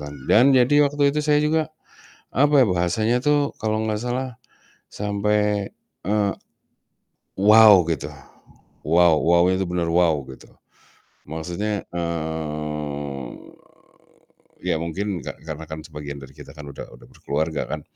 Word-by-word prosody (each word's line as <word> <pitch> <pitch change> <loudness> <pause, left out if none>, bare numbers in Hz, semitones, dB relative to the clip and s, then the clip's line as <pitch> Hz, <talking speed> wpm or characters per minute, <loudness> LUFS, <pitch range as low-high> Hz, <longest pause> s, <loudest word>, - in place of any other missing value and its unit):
kan 75 0 -7 0.2
dan 120 +5 +6
jadi 145 +4 +5
waktu 145 0 +2
itu 150 - +1
saya 150 -1 +3
juga, 155 +1 +1 0.7
apa 145 +1 +4
ya, - - +3
bahasanya 90 +7 +1
tuh 145 -1 +2
kalau 110 0 0
enggak 110 -1 -2
salah 125 0 -3 0.6
sampai, 105 0 -1 0.4
eee, 105 -1 +1 1.1
"Wow." 105 -1 +8
Gitu, 80 -4 -2 0.8
"Wow." 85 0 +5
Wow-nya 85 +2 +3
itu - - 0
bener 90 -1 -1
wow 85 -2 +3
gitu. 65 - -13 0.8
Maksudnya, 90 +6 -3
eee, 75 -4 -4 1.4
iya - - +1
mungkin 95 +3 -3
ka - - -6
karena 80 0 -7
kan 80 0 -6
sebagian 75 -2 -8
dari 65 0 -12
kita 75 -2 -12
kan 75 -1 -10
udah 70 - -9
udah - - -17
berkeluarga 80 +1 -3
kan. - - -4
90 Hz, 130 wpm, -22 LUFS, 80-110 Hz, 1.4 s, Wow